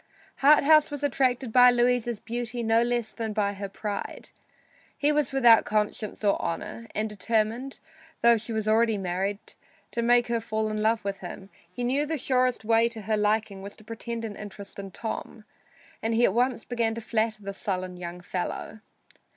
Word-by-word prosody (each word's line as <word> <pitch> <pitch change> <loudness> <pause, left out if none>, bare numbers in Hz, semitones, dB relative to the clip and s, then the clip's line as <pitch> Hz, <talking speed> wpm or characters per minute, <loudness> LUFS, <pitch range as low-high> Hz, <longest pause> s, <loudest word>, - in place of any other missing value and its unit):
Harthouse 300 +2 +6
was 290 -1 -6
attracted 260 -3 +1
by 250 +1 +8
Louisa's 240 -2 +1
beauty 240 +1 -4
no 225 +1 +3
less 240 -2 -1
than 225 -2 -4
by 205 -1 0
her 200 0 -6
pride. 205 0 -5 0.7
He 295 +1 +3
was 295 -3 +1
without 240 -5 +6
conscience 215 0 -2
or 200 -1 +2
honor, 225 +7 -4
and 215 +1 0
determined, 220 +5 -1 0.4
though 235 0 +6
she 230 +1 -5
was 220 -1 -2
already 220 0 +3
married, 190 +2 -2 0.5
to 235 - -1
make 240 +1 +4
her 235 -1 -1
fall 220 -1 -2
in 215 0 -2
love 220 0 +1
with 200 -1 -3
him. 190 +2 -9 0.2
He 245 +7 -5
knew 275 +5 +1
the 320 +1 -1
surest 255 -3 +1
way 225 +1 +4
to 225 -2 -6
her 215 +1 0
liking 210 -1 0
was 200 +1 -9
to 215 - -15
pretend 230 +1 -5
an 210 -2 -6
interest 200 -1 -9
in 195 -1 -6
Tom, 220 +1 -6 0.6
and 225 0 0
he 240 +1 +4
at - - +2
once 245 0 +1
began 230 -2 -1
to 230 - -5
flatter 220 -1 -1
the 200 0 -5
sullen 185 -3 -3
young 175 0 -7
fellow. 180 +4 -4
225 Hz, 185 wpm, -27 LUFS, 210-240 Hz, 0.7 s, by